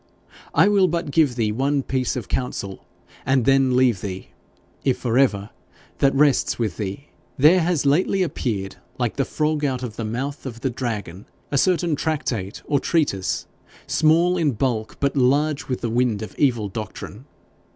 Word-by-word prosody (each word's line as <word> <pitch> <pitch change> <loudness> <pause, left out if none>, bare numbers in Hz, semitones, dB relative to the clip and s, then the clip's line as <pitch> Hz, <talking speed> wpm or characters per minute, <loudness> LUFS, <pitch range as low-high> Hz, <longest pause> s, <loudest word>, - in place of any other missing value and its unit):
I - - +6
will 200 -2 +4
but 170 -3 -2
give 145 -5 +3
thee 110 -3 0
one 135 +4 0
piece 130 -1 -1
of 125 - -5
counsel, 100 -6 -4 0.4
and 130 -2 +2
then 135 -2 +4
leave 125 -6 +3
thee 95 -2 -6 0.5
if 130 -2 +1
for 120 -2 -2
ever, 105 -6 +1 0.5
that 140 0 +3
rests 145 -1 +3
with 115 -4 -2
thee. 105 +7 -5 0.3
There 155 +7 +6
has 165 -3 0
lately 180 +6 +2
appeared, 105 - -3 0.2
like 120 -1 -2
the 135 - +1
frog 150 -1 -1
out 130 -3 -1
of 115 -3 -6
the 115 - -3
mouth 135 +6 -4
of 115 -2 -8
the 130 - -1
dragon, 105 -7 -5 0.2
a 140 - +1
certain 175 0 +2
tractate 130 -10 -3
or 145 -2 +1
treatise, 140 - 0 0.4
small 170 +3 +3
in 155 -5 +1
bulk, 110 -2 -2
but 140 0 0
large 145 +3 +2
with 125 - -3
the 120 - -1
wind 120 -3 +1
of 110 - -8
evil 120 -7 +2
doctrine. 110 +3 -7
130 Hz, 170 wpm, -22 LUFS, 115-150 Hz, 0.5 s, I